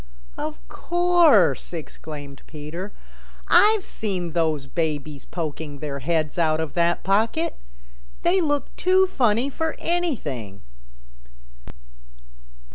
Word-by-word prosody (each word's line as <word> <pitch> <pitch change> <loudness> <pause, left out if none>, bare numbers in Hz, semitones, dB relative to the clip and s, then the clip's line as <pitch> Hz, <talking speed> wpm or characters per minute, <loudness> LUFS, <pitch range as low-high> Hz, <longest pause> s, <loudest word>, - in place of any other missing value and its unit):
"Of - - -6
course," 345 - +3
exclaimed 150 -3 -8
Peter. 160 +6 -7 0.6
"I've 425 -2 +5
seen 185 -6 -3
those 155 -4 0
babies 150 -2 -3
poking 155 -3 -5
their 140 -1 -5
heads 155 +3 -1
out 160 -1 +2
of 160 -3 -3
that 170 0 +1
pocket. 225 - +1 0.7
They 365 +2 +3
look 290 -3 -1
too 375 +1 +4
funny 255 - +1
for 320 +3 -2
anything." 150 - -2
170 Hz, 100 wpm, -24 LUFS, -, 0.7 s, I've